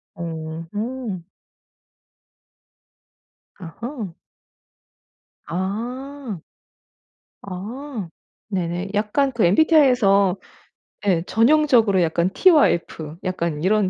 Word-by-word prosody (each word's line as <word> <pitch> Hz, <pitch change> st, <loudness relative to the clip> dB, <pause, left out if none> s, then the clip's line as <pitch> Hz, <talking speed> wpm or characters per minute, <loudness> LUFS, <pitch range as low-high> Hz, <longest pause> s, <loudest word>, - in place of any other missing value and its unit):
음음. 170 Hz, +6 st, -5 dB, 2.4 s
아하. 210 Hz, -, -7 dB, 1.3 s
아. 235 Hz, +5 st, -4 dB, 1.0 s
아 210 Hz, -, -6 dB, 0.4 s
네네. 180 Hz, 0 st, -2 dB
약간 220 Hz, +7 st, +1 dB
그 235 Hz, -5 st, 0 dB
MBTI에서 205 Hz, -, +4 dB, 0.7 s
예. 170 Hz, -4 st, +2 dB
전형적으로 230 Hz, -6 st, +4 dB
약간 170 Hz, +2 st, +1 dB
T와 340 Hz, -6 st, +6 dB
F 160 Hz, -2 st, -4 dB
약간 170 Hz, -5 st, -2 dB
이런 205 Hz, 0 st, +3 dB
200 Hz, 140 characters per minute, -22 LUFS, 175-250 Hz, 2.4 s, T와